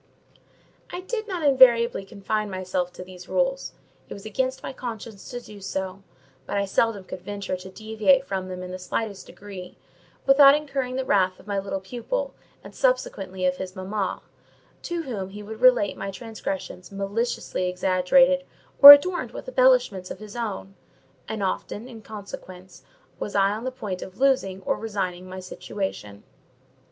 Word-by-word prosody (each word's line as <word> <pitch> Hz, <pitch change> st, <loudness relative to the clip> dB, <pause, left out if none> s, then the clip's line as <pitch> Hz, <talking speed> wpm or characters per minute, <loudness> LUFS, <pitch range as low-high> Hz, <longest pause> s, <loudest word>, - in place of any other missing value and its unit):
I 355 Hz, -, -6 dB
did 435 Hz, +3 st, -4 dB
not 360 Hz, -5 st, -3 dB
invariably 245 Hz, -7 st, +5 dB
confine 210 Hz, +1 st, -3 dB
myself 185 Hz, -1 st, -2 dB
to -, -, -8 dB
these 180 Hz, 0 st, -12 dB
rules: -, -, 0 dB, 0.4 s
it -, -, -6 dB
was 200 Hz, -, -11 dB
against 260 Hz, +5 st, -2 dB
my -, -, -5 dB
conscience 230 Hz, -5 st, -7 dB
to 245 Hz, -, -5 dB
do 210 Hz, -4 st, -13 dB
so; 190 Hz, 0 st, -4 dB, 0.5 s
but -, -, -2 dB
I 200 Hz, -, +1 dB
seldom 205 Hz, +1 st, +1 dB
could 185 Hz, -1 st, -8 dB
venture 200 Hz, -1 st, -4 dB
to 185 Hz, +1 st, -10 dB
deviate 220 Hz, +7 st, +2 dB
from 190 Hz, -5 st, -3 dB
them 185 Hz, 0 st, -6 dB
in 180 Hz, -, -7 dB
the 185 Hz, -, -6 dB
slightest 200 Hz, +2 st, -4 dB
degree, 190 Hz, -3 st, -10 dB, 0.5 s
without 275 Hz, +1 st, +8 dB
incurring 275 Hz, -4 st, -3 dB
the 260 Hz, 0 st, -2 dB
wrath 185 Hz, -5 st, +2 dB
of -, -, -16 dB
my 200 Hz, -1 st, -1 dB
little 195 Hz, 0 st, -3 dB
pupil, 255 Hz, -, -4 dB, 0.3 s
and -, -, -11 dB
subsequently 195 Hz, -, -1 dB
of 180 Hz, 0 st, +1 dB
his 185 Hz, -1 st, -6 dB
mamma; 195 Hz, +1 st, -3 dB, 0.6 s
to 345 Hz, -1 st, -3 dB
whom 205 Hz, -9 st, -5 dB
he 205 Hz, +2 st, -9 dB
would 220 Hz, +2 st, -9 dB
relate 250 Hz, -5 st, +5 dB
my 195 Hz, -, -5 dB
transgressions 195 Hz, -3 st, -6 dB
maliciously 200 Hz, -1 st, -2 dB
exaggerated, 190 Hz, +10 st, +3 dB, 0.4 s
or 285 Hz, 0 st, +16 dB
adorned 350 Hz, +5 st, +2 dB
with -, -, -9 dB
embellishments -, -, +3 dB
of -, -, -6 dB
his 215 Hz, 0 st, -11 dB
own; 205 Hz, -4 st, -4 dB, 0.5 s
and 220 Hz, -2 st, -3 dB
often, 205 Hz, +4 st, -3 dB
in 230 Hz, -3 st, -11 dB
consequence, 190 Hz, -3 st, -10 dB, 0.4 s
was 205 Hz, -, -5 dB
I 195 Hz, 0 st, +4 dB
on 220 Hz, +4 st, -4 dB
the 260 Hz, -, -2 dB
point 205 Hz, -8 st, -5 dB
of 190 Hz, -, -9 dB
losing 255 Hz, -9 st, +1 dB
or -, -, 0 dB
resigning 185 Hz, -4 st, -4 dB
my 185 Hz, 0 st, -7 dB
situation. 180 Hz, -, -6 dB
205 Hz, 165 wpm, -25 LUFS, 190-255 Hz, 0.6 s, or